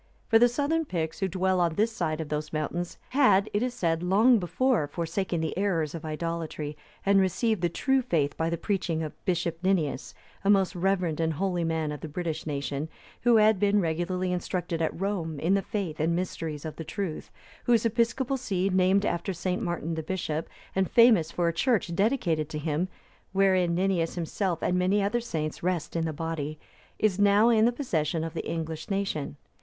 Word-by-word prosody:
For 225 - +6
the 240 - +7
southern 290 +6 0
Picts, 165 - -3
who 195 - +1
dwell 185 0 +1
on 170 -2 +1
this 220 +5 +2
side 155 -8 -2
of 160 -2 -4
those 150 0 -3
mountains, 165 +3 -3
had, 250 -7 +4
it 205 - +1
is 250 0 -1
said, 165 -6 0
long 215 +7 +4
before 210 - +1
forsaken 170 +2 -2
the 160 - -2
errors 175 -6 0
of 165 - -6
idolatry, 155 -1 -4 0.3
and 195 0 +5
received 195 +2 +1
the 175 - +2
true 265 - +1
faith 160 - 0
by 165 0 0
the 170 - -1
preaching 170 -4 -1
of 155 - -5
Bishop 170 -3 -1
Ninias,(302) 180 -6 0 0.3
a - - +3
most 195 -1 +3
reverend 180 -3 0
and 160 -1 +1
holy 180 +1 -1
man 160 -2 -1
of 150 - -6
the - - -5
British 160 0 -4
nation, 140 +1 -3 0.3
who 240 -1 +4
had 215 -2 +5
been 205 0 +3
regularly 180 +2 -1
instructed 175 -2 -2
at 160 - -1
Rome 175 -6 -2
in 170 +6 +2
the 195 - +3
faith 190 -8 -4
and 165 +2 +1
mysteries 165 -4 -4
of 155 - -6
the 165 - -5
truth; 165 +1 -4 0.4
whose 235 -2 +3
episcopal 235 +4 +1
see, 195 -6 -1
named 190 +2 +3
after 175 +2 -1
St. 180 +4 -2
Martin 170 -4 -2
the 160 - -2
bishop, 160 -2 -3 0.3
and 190 -1 +1
famous 220 -9 +5
for 175 -1 0
a 170 - +1
church 200 -2 +1
dedicated 175 - +1
to 155 - -4
him 155 +3 -1 0.5
(wherein 185 -3 +3
Ninias 180 -2 0
himself 175 0 -2
and 180 0 +1
many 185 +3 +2
other 225 +4 0
saints 155 -9 -4
rest 175 -2 -2
in 165 -1 0
the 160 - -1
body), 155 -1 -4 0.4
is 205 -3 +1
now 205 +3 +5
in 220 -2 +5
the 240 - +4
possession 165 - -1
of 165 0 -4
the 170 - -4
English 160 -1 -4
nation. 195 -8 -2
180 Hz, 195 wpm, -27 LUFS, 160-200 Hz, 0.5 s, the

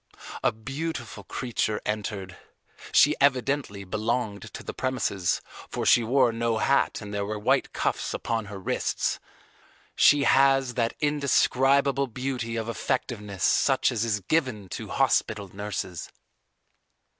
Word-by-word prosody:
A - - +4
beautiful 120 -2 -5
creature 110 -2 -2
entered. 100 -3 -4 0.6
She 150 - +6
evidently 135 -6 +1
belonged 110 +1 -2
to - - -7
the - - -6
premises, 100 -8 -1 0.3
for - - -3
she 120 - +5
wore 125 +1 +3
no 115 0 0
hat 140 +2 +1
and 105 0 -8
there 100 0 -1
were 105 +1 -3
white 105 - +1
cuffs - - -1
upon 115 -1 -2
her 100 0 -8
wrists. 95 - -1 0.8
She 145 -1 +5
has 135 -2 +4
that 115 -2 -1
indescribable 140 -1 +2
beauty 125 -1 -3
of 115 -1 -3
effectiveness 105 -5 -3
such - - +3
as 115 -2 -1
is 105 -3 0
given 110 - -1
to - - -6
hospital 100 -4 0
nurses. 100 -4 -5
115 Hz, 130 wpm, -26 LUFS, 105-135 Hz, 0.8 s, She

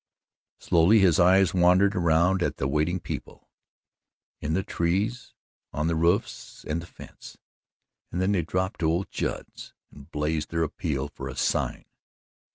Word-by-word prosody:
Slowly 85 +6 +4
his 95 -6 +4
eyes 95 +1 +5
wandered 90 +2 +4
around 85 +2 +2
at - - -1
the 65 - -1
waiting 75 +6 0
people - - -8 0.9
in 75 +1 -3
the 95 - 0
trees, 100 +10 -2 0.4
on 75 - -1
the 85 - +1
roofs 85 +7 -1
and 80 +2 -2
the 85 - -11
fence - - -13 0.7
and 90 - -3
then 95 +2 +1
they 95 -4 +2
dropped 95 +5 -2
to 80 - +1
old 85 +4 -1
Judd's - - -5 0.2
and 70 -1 -15
blazed 75 +1 -2
their 85 0 0
appeal 75 -3 -3
for 70 - -8
a - - -7
sign. - - -1
85 Hz, 155 wpm, -26 LUFS, 80-95 Hz, 0.9 s, eyes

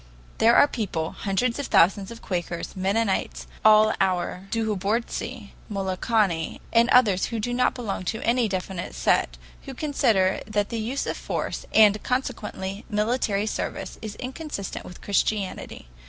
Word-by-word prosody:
There 230 +1 +6
are 285 - +7
people, 175 - -3
hundreds 230 +6 -1
of 285 - -3
thousands 195 +2 +4
of 235 - -10
Quakers, 175 -2 -4
Mennonites, 195 +2 0 0.2
all 215 0 +6
our 185 0 -1
Douhobortsi, 220 +1 -2 0.2
Molokani, 195 -2 0
and 235 +1 +5
others 210 -7 +4
who 230 - -3
do 245 +3 -2
not 250 +1 +2
belong 215 -7 -4
to 220 +5 -2
any 235 0 +2
definite 185 - -4
sect, - - +1 0.3
who 270 - -7
consider 230 -10 +2
that 205 -1 0
the 230 - -3
use 240 +6 -2
of - - -3
force - - -4
and, 210 -1 +6
consequently, 215 -6 -3
military 210 -1 0
service 215 - -4
is 215 -2 -6
inconsistent 260 - -6
with 180 - -11
Christianity. 200 - -2
210 Hz, 140 wpm, -25 LUFS, 190-235 Hz, 0.3 s, are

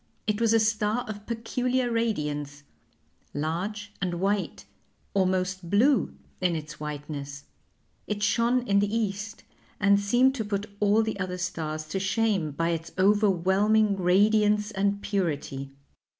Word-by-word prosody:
It 210 -1 -1
was 230 -1 +3
a 225 - +5
star 220 +2 +1
of 210 -1 -7
peculiar 245 +2 -1
radiance, 150 -11 -2 0.7
large 185 +8 -3
and 180 -2 -1
white 195 +3 -1 0.5
almost 185 -2 0
blue 245 +8 +3 0.3
in 180 -2 +2
its 150 -1 -7
whiteness 145 -1 -6 0.6
it 205 0 -2
shone 235 +3 +2
in 200 0 +4
the 205 0 0
East, 205 -1 -3 0.4
and 200 0 +4
seemed 245 +6 +3
to 245 -5 -3
put 205 0 -2
all 210 +2 +4
the 220 -2 -3
other 185 -1 -3
stars 155 -4 -4
to 195 - -2
shame 195 -3 +1
by 165 +4 -1
its 165 0 -3
overwhelming 205 +1 +3
radiance 210 +3 +3
and 200 0 0
purity. 145 -8 -2
200 Hz, 135 wpm, -27 LUFS, 175-215 Hz, 0.7 s, a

